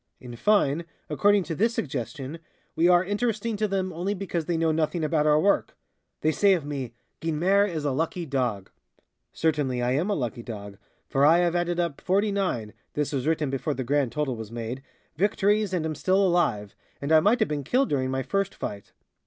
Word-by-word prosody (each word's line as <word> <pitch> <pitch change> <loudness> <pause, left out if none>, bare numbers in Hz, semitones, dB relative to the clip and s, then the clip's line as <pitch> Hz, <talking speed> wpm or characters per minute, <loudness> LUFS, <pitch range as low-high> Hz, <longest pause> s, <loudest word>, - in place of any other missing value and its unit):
In 120 -1 -9
fine, 170 - +2 0.3
according 205 +6 +3
to 170 - -4
this 225 +8 +1
suggestion, 135 +3 -4 0.4
we 165 +2 +4
are 175 0 +5
interesting 215 +2 -1
to 215 +1 +1
them 190 -2 -2
only 185 +5 -2
because 180 -4 -3
they 170 -2 0
know 165 0 +2
nothing 155 +1 0
about 155 0 +1
our 150 0 +5
work. 200 +5 +1 0.4
They 155 - +3
say 195 +6 +4
of 170 -6 -1
me: 135 -5 -4 0.3
"Guynemer 180 +6 +2
is 155 -4 -4
a 145 - +1
lucky 165 +5 -2
dog." 125 -9 -2 0.6
Certainly, 145 -6 0
I 120 - +1
am 155 +10 0
a 205 - +1
lucky 120 -3 -3
dog, 100 -4 -8 0.3
for 135 - +1
I 160 +4 +7
have 175 -1 +2
added 175 0 0
up 170 -5 -2
forty 200 +3 +1
nine 180 - -2 0.2
(this 150 0 -1
was 135 +1 -1
written 155 -3 +1
before 140 +2 -2
the 130 - -3
grand 140 -1 +1
total 150 -4 -1
was 110 -1 -8
made) 120 +2 -5 0.4
victories 205 +2 +2
and 175 -4 -1
am 160 - -1
still 190 +6 +2
alive, 140 - +1 0.3
and 140 +2 -3
I 160 - +8
might 210 +8 +3
have 220 - +2
been 145 -2 -2
killed 255 - +1
during 130 -2 0
my 130 0 -1
first 195 +3 -1
fight. 100 -1 -6
160 Hz, 200 wpm, -26 LUFS, 135-190 Hz, 0.6 s, I